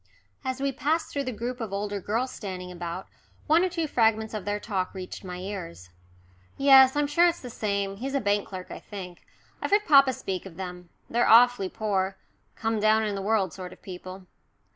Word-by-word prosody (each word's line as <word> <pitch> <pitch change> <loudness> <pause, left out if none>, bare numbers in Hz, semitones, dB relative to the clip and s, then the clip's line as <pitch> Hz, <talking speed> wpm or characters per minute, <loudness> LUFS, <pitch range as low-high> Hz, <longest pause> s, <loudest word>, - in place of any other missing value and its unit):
As 260 -1 -3
we 275 0 0
passed 305 +5 -1
through 280 -1 -1
the 255 - -2
group 245 +2 -5
of 220 -3 -4
older 200 0 -3
girls 235 +7 -1
standing 185 -3 -6
about, 175 +1 -6 0.4
one 320 +4 +4
or 370 - +1
two 335 -2 -2
fragments 220 -5 +1
of 210 -3 -4
their 205 0 -1
talk 190 -2 -3
reached 185 +1 -7
my 180 -1 -6
ears. 180 - -7 0.7
"Yes 270 -1 +7
I'm 295 0 +2
sure 335 +5 +4
it's 340 0 0
the 250 - -8
same. 200 -2 -2
He's 270 +5 -4
a - - +3
bank 205 -3 0
clerk, 185 -2 -8
I - - -6
think. 185 -4 -9 0.4
I've - - -2
heard 415 +1 +3
papa 275 -5 +6
speak 195 -4 -4
of 175 - -12
them. 180 -2 -7 0.2
They're 240 +1 +2
awfully 235 -4 +6
poor 195 -3 -1 0.4
come 225 -1 -1
down 215 +1 +4
in 210 -1 -1
the 195 - -3
world 195 -3 +1
sort 185 -1 -8
of - - -19
people." 185 0 -9
210 Hz, 205 wpm, -27 LUFS, 190-255 Hz, 0.7 s, Yes